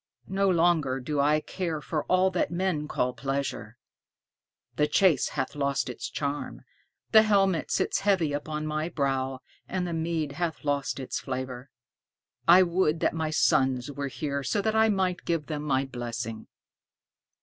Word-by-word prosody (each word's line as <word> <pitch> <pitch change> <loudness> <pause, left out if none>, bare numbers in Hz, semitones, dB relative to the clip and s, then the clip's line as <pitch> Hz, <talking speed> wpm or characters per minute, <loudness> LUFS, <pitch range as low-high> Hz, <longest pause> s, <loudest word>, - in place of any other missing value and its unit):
No 195 0 +2
longer 165 -7 +2
do 145 +3 -3
I 150 +2 +3
care 170 -3 -3
for 150 0 -3
all 185 +1 +3
that 180 - 0
men 170 -4 -1
call 125 -3 -1
pleasure. 135 -4 -3 1.0
The 150 - +2
chase 180 -8 +3
hath - - -1
lost 140 -2 -1
its 125 - -5
charm, 145 0 -4 0.5
the 220 - +9
helmet 195 -5 +2
sits - - +1
heavy 185 -7 +2
upon 150 +1 -3
my 155 +2 -2
brow, 135 -4 -1 0.3
and 185 -1 -1
the 175 - -3
mead 160 -2 -1
hath 160 -4 -3
lost 145 -2 -1
its 130 - -3
flavor. 130 0 -5 0.8
I 180 +2 +8
would 170 -3 +1
that - - +2
my 160 -1 -1
sons 130 -3 +2
were 140 0 -4
here 140 +1 -3
so 205 +9 -1
that 220 0 0
I 220 0 +5
might 190 -3 0
give 165 -3 -1
them 150 -1 -4
my 135 -2 +1
blessing." 120 -3 -5
150 Hz, 160 wpm, -27 LUFS, 135-175 Hz, 1.0 s, the